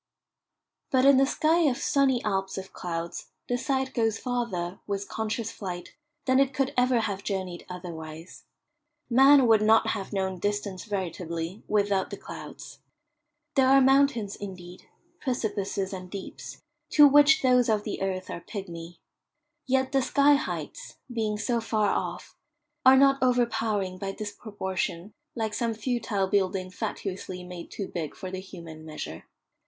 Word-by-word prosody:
But 260 Hz, 0 st, +3 dB
in 275 Hz, -1 st, +7 dB
the 270 Hz, 0 st, +4 dB
sky 315 Hz, +4 st, +2 dB
of 245 Hz, -, -2 dB
"sunny 270 Hz, -3 st, +2 dB
Alps" 195 Hz, -2 st, -1 dB
of 190 Hz, 0 st, -7 dB
clouds 170 Hz, -1 st, -5 dB, 0.2 s
the 245 Hz, -, 0 dB
sight 265 Hz, +1 st, -1 dB
goes 225 Hz, -3 st, +1 dB
farther, 230 Hz, -8 st, -3 dB
with 200 Hz, -1 st, -3 dB
conscious 220 Hz, 0 st, -3 dB
flight, 180 Hz, -3 st, -7 dB, 0.3 s
than 260 Hz, 0 st, +4 dB
it 275 Hz, -1 st, +2 dB
could 270 Hz, -1 st, 0 dB
ever 250 Hz, -1 st, +3 dB
have 200 Hz, -3 st, -3 dB
journeyed 185 Hz, -3 st, -4 dB
otherwise. 165 Hz, -2 st, -8 dB, 0.7 s
Man 270 Hz, +2 st, +7 dB
would 220 Hz, -2 st, +5 dB
not 220 Hz, +1 st, +4 dB
have 200 Hz, -4 st, -3 dB
known 190 Hz, -2 st, -2 dB
distance 205 Hz, -1 st, -2 dB
veritably 175 Hz, -2 st, -4 dB
without 200 Hz, -2 st, +1 dB
the -, -, -6 dB
clouds. -, -, -10 dB, 0.7 s
There 265 Hz, -2 st, +4 dB
are 270 Hz, +1 st, +7 dB
mountains 265 Hz, -6 st, +3 dB
indeed, 185 Hz, -3 st, -9 dB, 0.3 s
precipices 205 Hz, -6 st, -2 dB
and 185 Hz, -1 st, -7 dB
deeps, 195 Hz, 0 st, -8 dB, 0.4 s
to 295 Hz, -1 st, +9 dB
which 290 Hz, +2 st, +6 dB
those 250 Hz, -2 st, +4 dB
of 210 Hz, -1 st, +2 dB
the 210 Hz, -, -4 dB
earth 185 Hz, -1 st, -2 dB
are -, -, -6 dB
pigmy. 170 Hz, -3 st, -7 dB, 0.7 s
Yet 260 Hz, 0 st, +1 dB
the 270 Hz, -, +3 dB
sky 285 Hz, +2 st, +4 dB
heights, -, -, -3 dB, 0.2 s
being 215 Hz, -2 st, -1 dB
so 235 Hz, +2 st, 0 dB
far 215 Hz, -2 st, +1 dB
off, -, -, -3 dB, 0.5 s
are 260 Hz, +1 st, +8 dB
not 275 Hz, 0 st, +5 dB
overpowering 225 Hz, -7 st, +1 dB
by 195 Hz, 0 st, -3 dB
disproportion, 200 Hz, -3 st, -4 dB, 0.2 s
like 220 Hz, -3 st, -2 dB
some 230 Hz, +1 st, -1 dB
futile 220 Hz, -4 st, -1 dB
building 190 Hz, -1 st, 0 dB
fatuously 185 Hz, -1 st, -5 dB
made 180 Hz, -1 st, -8 dB
too 200 Hz, -, -5 dB
big 160 Hz, -4 st, -5 dB
for 185 Hz, -, -7 dB
the 185 Hz, -, -4 dB
human 165 Hz, -4 st, -10 dB
measure. 155 Hz, -, -7 dB
205 Hz, 150 wpm, -27 LUFS, 185-250 Hz, 0.7 s, to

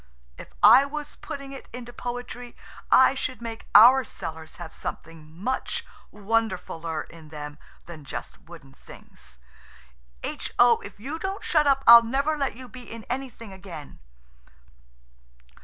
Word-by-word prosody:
If -, -, -12 dB
I 270 Hz, -, +9 dB
was 295 Hz, +1 st, -6 dB
putting 275 Hz, -1 st, -8 dB
it 275 Hz, -, -10 dB
into 240 Hz, 0 st, -9 dB
poetry 245 Hz, 0 st, -7 dB, 0.3 s
I 260 Hz, 0 st, +6 dB
should 255 Hz, -1 st, -4 dB
make 230 Hz, -1 st, -8 dB
our 250 Hz, +5 st, +9 dB
cellars 160 Hz, -7 st, -8 dB
have 170 Hz, -2 st, -9 dB
something 160 Hz, -2 st, -8 dB
much 255 Hz, +6 st, -3 dB, 0.3 s
wonderfuller 190 Hz, -7 st, -2 dB
in 160 Hz, -2 st, -14 dB
them 150 Hz, -1 st, -8 dB, 0.3 s
than 165 Hz, -3 st, -10 dB
just 140 Hz, -, -8 dB
wooden 155 Hz, -5 st, -14 dB
things. -, -, -15 dB, 0.8 s
H.O., 240 Hz, -1 st, +2 dB
if 200 Hz, 0 st, -12 dB
you 285 Hz, +9 st, -5 dB
don't 385 Hz, +2 st, -4 dB
shut 305 Hz, -3 st, +2 dB
up 275 Hz, -1 st, +3 dB
I'll 235 Hz, 0 st, +11 dB
never 275 Hz, +6 st, 0 dB
let 275 Hz, -5 st, -2 dB
you 255 Hz, +1 st, -10 dB
be 250 Hz, -1 st, -12 dB
in 230 Hz, -1 st, -8 dB
anything 245 Hz, -5 st, -6 dB
again." 180 Hz, -6 st, -10 dB
230 Hz, 140 wpm, -25 LUFS, 170-260 Hz, 0.8 s, I'll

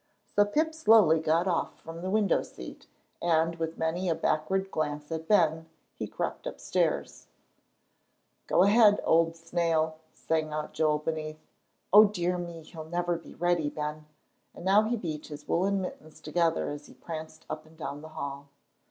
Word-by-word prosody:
So 205 Hz, -, +6 dB
Pip 310 Hz, +9 st, 0 dB
slowly 220 Hz, -, +5 dB
got 160 Hz, +3 st, +1 dB
off 170 Hz, -3 st, -1 dB
from 165 Hz, +1 st, -9 dB
the 185 Hz, -, -3 dB
window 205 Hz, -2 st, +2 dB
seat, 65 Hz, -, -10 dB, 0.3 s
and, 165 Hz, 0 st, +2 dB
with 165 Hz, 0 st, -3 dB
many 170 Hz, +3 st, -1 dB
a 165 Hz, -, +2 dB
backward 190 Hz, +5 st, 0 dB
glance 150 Hz, 0 st, -3 dB
at 160 Hz, 0 st, -4 dB
Ben, 160 Hz, -6 st, +3 dB, 0.3 s
he -, -, -4 dB
crept -, -, -4 dB
upstairs. -, -, -2 dB, 1.2 s
"Go 180 Hz, -, +4 dB
ahead, 205 Hz, +1 st, +6 dB
old 165 Hz, 0 st, +3 dB
snail," 165 Hz, -1 st, 0 dB
sang 155 Hz, -1 st, -1 dB
out 150 Hz, 0 st, -4 dB
Joel 155 Hz, -1 st, +2 dB
beneath. 155 Hz, 0 st, -5 dB, 0.5 s
"O 210 Hz, +1 st, +10 dB
dear 180 Hz, -3 st, -1 dB
me! 170 Hz, -2 st, -7 dB
He'll 160 Hz, 0 st, -9 dB
never 175 Hz, 0 st, 0 dB
be 165 Hz, -, -10 dB
ready, 175 Hz, -3 st, +1 dB
Ben," 150 Hz, 0 st, -5 dB, 0.5 s
and -, -, -9 dB
now 195 Hz, +2 st, +6 dB
he 235 Hz, +2 st, 0 dB
beat 155 Hz, -7 st, -5 dB
his 150 Hz, -1 st, -9 dB
woollen 195 Hz, +3 st, +1 dB
mittens 155 Hz, -4 st, -8 dB
together 165 Hz, +1 st, 0 dB
as 145 Hz, 0 st, -8 dB
he -, -, -16 dB
pranced 160 Hz, -1 st, -8 dB
up -, -, -6 dB
and 160 Hz, 0 st, -19 dB
down 145 Hz, -2 st, -5 dB
the 160 Hz, -, -10 dB
hall. 140 Hz, -1 st, -5 dB
165 Hz, 165 wpm, -29 LUFS, 155-180 Hz, 1.2 s, O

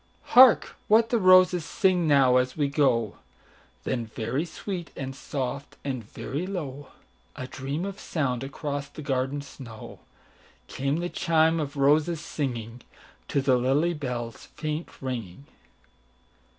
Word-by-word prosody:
"Hark 255 Hz, -2 st, +7 dB
what 225 Hz, +2 st, +5 dB
the 235 Hz, -, +3 dB
roses 185 Hz, -2 st, +6 dB
sing 185 Hz, -2 st, +1 dB
now, 135 Hz, -4 st, +5 dB
as 125 Hz, +2 st, 0 dB
we 145 Hz, -2 st, +2 dB
go;"Then 120 Hz, -2 st, -2 dB
very 115 Hz, +7 st, -2 dB
sweet 175 Hz, 0 st, -6 dB
and 135 Hz, -1 st, -5 dB
soft, 135 Hz, +1 st, -5 dB
and 130 Hz, -4 st, -3 dB
very 140 Hz, -, -5 dB
low,—A 145 Hz, -6 st, -8 dB
dream 140 Hz, +6 st, -4 dB
of 200 Hz, 0 st, -6 dB
sound 135 Hz, -6 st, -2 dB
across 140 Hz, +1 st, -4 dB
the 155 Hz, -, -9 dB
garden 135 Hz, +1 st, -1 dB
snow,—Came 135 Hz, +2 st, -8 dB
the 175 Hz, -, -2 dB
chime 160 Hz, -1 st, +2 dB
of 145 Hz, -1 st, -4 dB
roses 150 Hz, +4 st, +3 dB
singingTo 120 Hz, -, -5 dB
the 130 Hz, -2 st, +4 dB
lily 140 Hz, +7 st, +2 dB
bell's 120 Hz, -6 st, -5 dB
faint 155 Hz, +2 st, -3 dB, 0.2 s
ringing. 120 Hz, -3 st, -5 dB
140 Hz, 120 wpm, -26 LUFS, 130-160 Hz, 0.2 s, Hark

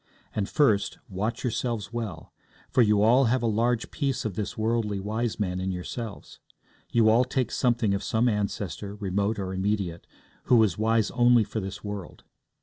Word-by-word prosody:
And 100 Hz, -2 st, -1 dB
first, 110 Hz, -9 st, +2 dB
watch 105 Hz, +5 st, -3 dB
yourselves 120 Hz, -3 st, -2 dB
well, 105 Hz, -9 st, -5 dB, 0.4 s
for 125 Hz, -, +4 dB
you 105 Hz, -2 st, +4 dB
all 125 Hz, +5 st, +5 dB
have 120 Hz, +1 st, +1 dB
a -, -, +1 dB
large 115 Hz, +2 st, +1 dB
piece 135 Hz, -7 st, -1 dB
of 110 Hz, -, -2 dB
this 100 Hz, +3 st, -4 dB
worldly 110 Hz, -2 st, 0 dB
wise 110 Hz, +3 st, -2 dB
man 90 Hz, -3 st, -1 dB
in 95 Hz, +1 st, -2 dB
yourselves. 100 Hz, +4 st, -6 dB, 0.5 s
You 115 Hz, -2 st, +4 dB
all 115 Hz, +3 st, +5 dB
take 125 Hz, -1 st, -1 dB
something 120 Hz, -5 st, +1 dB
of 100 Hz, -, -1 dB
some 115 Hz, +2 st, +1 dB
ancestor, 100 Hz, -2 st, -2 dB
remote 100 Hz, +1 st, -1 dB
or 95 Hz, -2 st, -3 dB
immediate, 95 Hz, -3 st, -2 dB, 0.4 s
who 125 Hz, -, +4 dB
was 110 Hz, -6 st, +4 dB
wise 110 Hz, 0 st, +1 dB
only 120 Hz, -1 st, +5 dB
for 105 Hz, +2 st, -4 dB
this 95 Hz, -1 st, -6 dB
world. 105 Hz, -3 st, -7 dB
110 Hz, 170 wpm, -27 LUFS, 100-120 Hz, 0.5 s, all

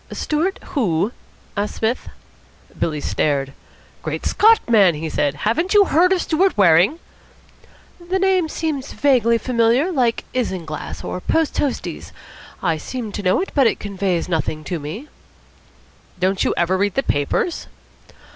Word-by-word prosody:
"Stewart 325 Hz, +6 st, -1 dB
who?" 200 Hz, -, 0 dB, 0.4 s
asked 205 Hz, +1 st, -2 dB
Psmith. 230 Hz, +3 st, -2 dB, 0.7 s
Billy 150 Hz, -3 st, -1 dB
stared. 140 Hz, -3 st, -1 dB, 0.5 s
"Great -, -, -4 dB
Scott, 445 Hz, +1 st, +5 dB
man!" 200 Hz, -8 st, +5 dB
he 160 Hz, +2 st, -4 dB
said, 145 Hz, -2 st, 0 dB
"haven't 330 Hz, -, +1 dB
you 405 Hz, -1 st, +7 dB
heard 360 Hz, +2 st, +3 dB
of 375 Hz, -2 st, +2 dB
Stewart 365 Hz, -, +1 dB
Waring?" 185 Hz, -, +5 dB, 1.1 s
"The 380 Hz, -, +1 dB
name 380 Hz, -3 st, +2 dB
seems 305 Hz, -4 st, -3 dB
vaguely 245 Hz, -5 st, +3 dB
familiar, 240 Hz, +7 st, +2 dB
like 245 Hz, -7 st, +1 dB
Isinglass 180 Hz, -11 st, -4 dB
or 180 Hz, -, -5 dB
Post 320 Hz, -, 0 dB
toasties. 285 Hz, -3 st, -3 dB, 0.5 s
I 165 Hz, -3 st, +1 dB
seem 230 Hz, +6 st, -6 dB
to 205 Hz, -, -5 dB
know 185 Hz, -, +2 dB
it, 385 Hz, -, -4 dB
but 270 Hz, -4 st, +4 dB
it -, -, 0 dB
conveys 195 Hz, -4 st, -2 dB
nothing 155 Hz, -2 st, -2 dB
to 175 Hz, +1 st, -4 dB
me." 160 Hz, -, -7 dB, 1.1 s
"Don't 185 Hz, +1 st, +1 dB
you -, -, 0 dB
ever 180 Hz, +2 st, +1 dB
read 200 Hz, -1 st, 0 dB
the 270 Hz, -, +1 dB
papers?" 145 Hz, -, -1 dB
225 Hz, 145 wpm, -20 LUFS, -, 1.1 s, you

